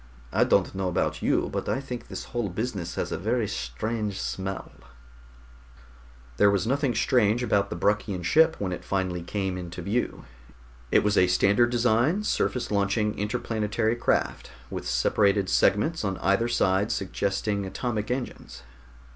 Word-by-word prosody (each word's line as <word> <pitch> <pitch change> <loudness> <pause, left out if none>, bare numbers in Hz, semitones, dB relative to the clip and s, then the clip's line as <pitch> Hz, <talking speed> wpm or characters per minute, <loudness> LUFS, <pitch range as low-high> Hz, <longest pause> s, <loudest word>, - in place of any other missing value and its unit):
"I - - +4
don't - - +2
know 95 -1 -2
about 90 - -1
you, - - +1
but - - -2
I - - 0
think 125 -3 -7
this - - -6
whole 120 -5 -3
business 95 -4 -4
has - - -3
a - - -2
very 110 +3 0
strange 100 - -3
smell." 95 0 -4 1.7
There 100 - +6
was 100 -2 +1
nothing 135 +1 0
strange 120 -2 +2
about 100 -4 +1
the - - -4
Bruckian 100 -3 0
ship 160 - +4
when 95 -2 -3
it 90 - -5
finally 95 -2 -1
came 95 +1 -3
into 90 0 -7
view. 110 +7 -2 0.7
It - - +4
was 105 0 +3
a 90 - +5
standard 100 +6 +3
design, 120 - +2
surface 125 - -1
launching 105 +1 +1
interplanetary 110 +1 -1
craft, 120 - 0 0.2
with - - -5
separated 95 - +2
segments 155 - +2
on 95 -2 -1
either 100 +5 +2
side 100 -2 +1
suggesting 100 +1 -1
atomic 110 +2 -3
engines. 125 - -5
105 Hz, 150 wpm, -26 LUFS, 95-120 Hz, 1.7 s, There